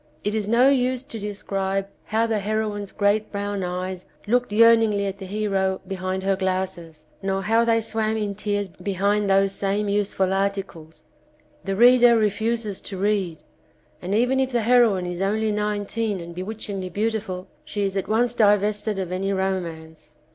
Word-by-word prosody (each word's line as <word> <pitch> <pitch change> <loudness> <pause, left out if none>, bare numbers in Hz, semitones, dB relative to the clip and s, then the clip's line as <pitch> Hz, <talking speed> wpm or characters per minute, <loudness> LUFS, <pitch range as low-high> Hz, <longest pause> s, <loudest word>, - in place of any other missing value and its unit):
It 210 - -1
is 215 -2 -1
no 235 +4 +5
use 255 -2 +2
to 270 -5 -7
describe 195 -1 -2 0.2
how 220 +1 +1
the 225 -2 0
heroine's 210 -1 -2
great 205 +1 +1
brown 200 -1 -3
eyes 180 +1 -4 0.2
looked 245 +2 +1
yearningly 225 -2 +5
at 195 0 -4
the 190 - -7
hero 195 -2 0
behind 190 0 -3
her 195 0 +2
glasses, 185 -4 -3 0.2
nor 195 0 -1
how 225 +3 +3
they 230 -1 +2
swam 220 0 -1
in 210 -2 -2
tears 205 0 -2
behind 200 +2 -1
those 195 0 +3
same 200 +1 -1
useful 200 -2 0
articles, 190 -6 -3 0.6
the 195 0 -2
reader 240 +1 +6
refuses 220 0 -1
to 195 - -7
read, 195 -4 -1 0.6
and 190 +3 -2
even 250 +4 +2
if 265 0 0
the 240 -2 +1
heroine 225 -5 +4
is 180 0 -4
only 215 +2 +1
nineteen 210 0 -2
and 170 0 -8
bewitchingly 195 0 -5
beautiful, 200 -2 -2 0.2
she 205 - -3
is 195 -1 -1
at 195 - -2
once 235 +2 +2
divested 210 -1 +2
of 185 -2 -3
any 190 +2 -1
romance. 165 -5 -4
205 Hz, 160 wpm, -23 LUFS, 190-220 Hz, 0.6 s, reader